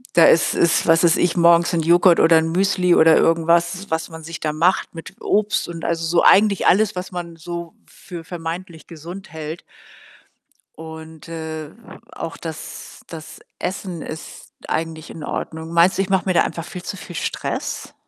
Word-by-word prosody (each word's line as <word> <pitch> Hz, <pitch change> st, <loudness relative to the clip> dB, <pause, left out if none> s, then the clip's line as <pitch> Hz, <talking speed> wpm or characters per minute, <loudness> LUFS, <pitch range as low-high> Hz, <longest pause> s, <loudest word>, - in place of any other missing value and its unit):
da 170 Hz, -, +7 dB
ist 165 Hz, -, +4 dB
ist, 170 Hz, -, +2 dB
was 165 Hz, +1 st, +4 dB
weiß 170 Hz, -1 st, +4 dB
ich, 175 Hz, 0 st, +1 dB
morgens 170 Hz, 0 st, +4 dB
Joghurt 175 Hz, +2 st, +5 dB
oder 165 Hz, 0 st, +6 dB
Müsli 180 Hz, +2 st, +1 dB
oder 160 Hz, -1 st, +6 dB
irgendwas, 170 Hz, +3 st, +2 dB
was 160 Hz, +1 st, -2 dB
man 160 Hz, 0 st, -10 dB
sich 165 Hz, 0 st, -7 dB
da 155 Hz, -1 st, -2 dB
macht 175 Hz, +5 st, +1 dB
mit 165 Hz, -1 st, -10 dB
Obst 210 Hz, 0 st, 0 dB
und 165 Hz, -1 st, -8 dB
also, 165 Hz, -1 st, -1 dB
so 170 Hz, +1 st, +2 dB
eigentlich 200 Hz, -1 st, +4 dB
alles, 210 Hz, +1 st, +3 dB
was 180 Hz, 0 st, -5 dB
man 175 Hz, -2 st, -6 dB
so 170 Hz, 0 st, -7 dB
für 170 Hz, -2 st, -10 dB
vermeintlich 165 Hz, 0 st, -7 dB
gesund 170 Hz, +5 st, -10 dB
hält. 160 Hz, +1 st, -7 dB, 1.1 s
Und, 160 Hz, 0 st, -10 dB
äh, 160 Hz, -2 st, -6 dB, 0.4 s
auch 165 Hz, -, -6 dB
das 160 Hz, -2 st, -9 dB
das 160 Hz, -2 st, -10 dB, 0.2 s
Essen 180 Hz, -3 st, -4 dB
ist 160 Hz, +1 st, -9 dB, 0.2 s
eigentlich 160 Hz, 0 st, -4 dB
in 160 Hz, -, -9 dB
Ordnung. 160 Hz, +2 st, -5 dB
Meinst 170 Hz, +3 st, +4 dB
du, -, -, +2 dB
ich 195 Hz, -, -3 dB
mache 190 Hz, -1 st, +2 dB
mir 185 Hz, -, +1 dB
da -, -, +4 dB
einfach 165 Hz, -, -5 dB
viel 180 Hz, -, -8 dB
zu 195 Hz, +2 st, -6 dB
viel 175 Hz, -, -10 dB
Stress? -, -, -4 dB
170 Hz, 175 wpm, -20 LUFS, 160-180 Hz, 1.1 s, da